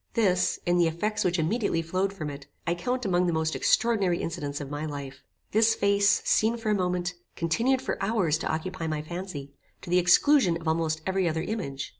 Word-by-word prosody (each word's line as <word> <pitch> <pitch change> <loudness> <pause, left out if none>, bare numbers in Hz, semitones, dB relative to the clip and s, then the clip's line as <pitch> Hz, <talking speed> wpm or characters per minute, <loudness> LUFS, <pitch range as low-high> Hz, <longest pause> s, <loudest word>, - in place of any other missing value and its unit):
This, 185 -6 +2
in 175 0 +2
the 170 - +4
effects 170 +7 -1
which 180 0 +1
immediately 165 0 0
flowed 185 +4 -1
from 155 -7 -5
it, 140 0 -10 0.2
I 170 - +1
count 245 +8 -2
among 180 -2 +2
the 170 - +1
most 160 0 0
extraordinary 200 -7 +2
incidents 145 -4 -4
of 140 -1 -7
my 145 +1 -4
life. 140 -3 -6 0.3
This 225 +1 +4
face, 200 -1 +3
seen 225 +2 +2
for 225 -2 -1
a - - +4
moment, 180 -2 -1 0.2
continued 230 +11 +1
for - - -3
hours 185 -8 +1
to - - -2
occupy 165 +1 -3
my 155 -1 -2
fancy, 155 -4 -7 0.3
to 175 - -7
the 180 - +5
exclusion 180 - +4
of 165 - -8
almost 160 -1 0
every 190 -2 +1
other 160 0 -2
image. 160 -11 -4
175 Hz, 200 wpm, -27 LUFS, 160-200 Hz, 0.3 s, the